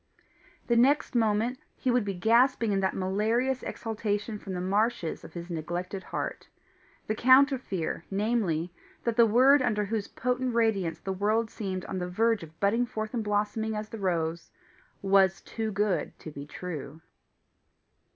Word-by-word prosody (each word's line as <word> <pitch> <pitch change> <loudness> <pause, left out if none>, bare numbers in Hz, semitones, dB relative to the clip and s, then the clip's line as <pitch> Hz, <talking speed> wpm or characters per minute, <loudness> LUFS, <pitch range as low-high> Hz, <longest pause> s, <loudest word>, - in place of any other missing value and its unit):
The 235 - +2
next 270 +6 +3
moment 230 +2 +1 0.2
he 255 - 0
would 245 -2 +2
be 195 -1 -3
gasping 230 +4 +3
in 195 - +1
that 190 -1 0
malarious 220 +7 0
exhalation 215 -1 -3
from 195 - -7
the - - -3
marshes 200 0 0
of 160 - -11
his 170 +1 -6
neglected 175 +4 -4
heart - - -5 0.6
the 215 - -1
counter 260 +4 +5
fear, 180 -8 -3
namely, 195 -5 0 0.3
that 235 -1 0
the 235 0 +6
word 260 +6 +6
under 215 -4 +1
whose 210 0 -2
potent 250 0 -1
radiance 200 -8 +1
the 190 +3 -4
world 215 +4 0
seemed 190 -3 -4
on 190 - -4
the 180 0 -3
verge 225 +3 +2
of 160 -1 -12
budding 225 +5 +2
forth 215 0 -4
and 235 -3 -1
blossoming 210 +1 -1
as 215 0 -4
the 225 - -7
rose, 170 -3 -1 0.5
was 195 -1 +4
TOO 220 -1 -4
GOOD 200 -2 -1
TO 155 - -9
BE 140 0 -8
TRUE. 160 -3 -7
210 Hz, 160 wpm, -28 LUFS, 185-230 Hz, 0.6 s, the